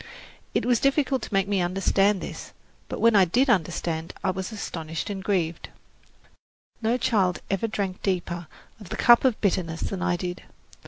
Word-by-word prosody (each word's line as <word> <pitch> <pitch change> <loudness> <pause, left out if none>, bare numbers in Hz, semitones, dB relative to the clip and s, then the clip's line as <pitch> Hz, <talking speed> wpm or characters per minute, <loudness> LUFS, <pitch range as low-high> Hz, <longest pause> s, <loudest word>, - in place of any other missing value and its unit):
It - - +1
was 245 -2 +3
difficult 275 -2 +2
to - - -7
make 195 -1 +2
me 200 -2 +1
understand 195 +2 +2
this; - - -8 0.4
but - - -4
when 230 -1 +4
I 195 - +7
did 245 - +3
understand 165 -4 -1
I - - +2
was 190 +3 -5
astonished 165 -4 -5
and 195 -1 -5
grieved. 175 -5 -1 1.1
No 230 +2 +1
child 195 -7 +1
ever 195 +3 0
drank 195 -4 -3
deeper 175 -3 -2 0.3
of 205 -5 -11
the 215 - -4
cup 240 -1 +6
of 250 -4 +2
bitterness 175 -5 0
than 190 -2 -3
I 180 -1 +1
did. 180 0 -4
195 Hz, 170 wpm, -25 LUFS, 175-220 Hz, 1.1 s, I